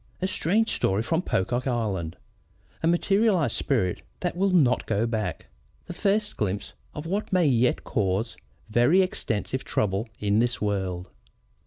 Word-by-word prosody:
A 185 - 0
Strange 210 +5 +1
Story 100 +3 +1
from 165 +7 0
Pocock 120 - -1
Island 105 -10 -2 0.6
A 160 - +1
Materialized 180 - +2
Spirit 110 -10 0 0.2
that 175 -1 -1
Will 195 +2 +2
not 145 -9 +3
Go 110 +1 +1
back. 110 -2 -3 0.4
The 175 - -7
First 205 +3 0
Glimpse 100 -1 -2 0.2
of 150 - -5
what 200 +5 -2
May 180 -3 +3
yet 125 -3 +2
Cause 105 +3 -1 0.3
very 120 - +4
Extensive 130 - -2
Trouble 105 +3 -1
in 105 +1 +1
this 120 +1 +1
World. 95 -4 -2
120 Hz, 145 wpm, -26 LUFS, -, 0.6 s, very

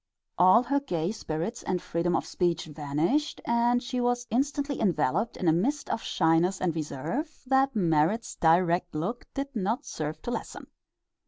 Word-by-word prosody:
All 185 +7 +7
her 280 +3 +1
gay 175 - -2
spirits 195 +2 -4
and 185 -1 -1
freedom 170 0 -1
of - - 0
speech 170 -2 -1
vanished, 155 - -1
and 240 +1 +2
she 250 0 -2
was 245 0 0
instantly 280 +3 0
enveloped 195 - +1
in 180 - -2
a 160 - +5
mist 270 - 0
of 225 - -1
shyness 165 +4 +2
and 170 -3 0
reserve 230 - -4
that 265 0 +2
Merrit's 175 +4 +1
direct 175 +1 +2
look 190 +11 -3
did 275 0 -4
not 225 +7 -1
serve 155 0 -4
to 240 - -3
lessen. - - -5
195 Hz, 160 wpm, -28 LUFS, 165-245 Hz, -, All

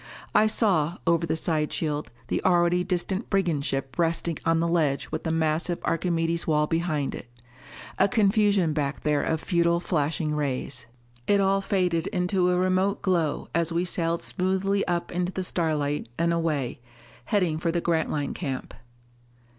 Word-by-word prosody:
I 215 +1 +5
saw, 180 -7 +2
over 170 0 +2
the 160 - 0
side 155 -2 0
shield, 150 -2 -2 0.2
the - - -2
already 175 -1 +3
distant 185 +3 -2
brigand 175 -8 +1
ship 135 -1 -3
resting 165 0 0
on 165 0 +3
the 170 - +1
ledge 155 -5 +1
with 155 +2 -4
the 160 - 0
massive 160 +2 0
Archimedes' 165 0 0
wall 150 -1 +3
behind 155 -3 -1
it. - - -8 0.7
A 195 - +5
confusion 200 -5 +3
back 145 -2 -2
there 150 -1 +2
of 160 +2 -1
futile 170 0 +1
flashing 155 -2 -1
rays. 135 -4 -3 0.4
It 205 0 +4
all 195 0 +2
faded 180 -4 0
into 180 -1 +1
a 180 - +2
remote 185 +2 +1
glow 170 -6 0
as 170 0 +1
we 170 +2 0
sailed 170 -1 -1
smoothly 190 +1 0
up 175 -1 -1
into 180 +1 -1
the 190 - -2
starlight 150 -7 -1
and 170 0 +2
away, 155 -8 -1 0.5
heading 180 -8 +1
for 170 0 0
the 170 - 0
Grantline 160 -4 -1
camp. 135 -7 -5
170 Hz, 160 wpm, -26 LUFS, 155-180 Hz, 0.7 s, I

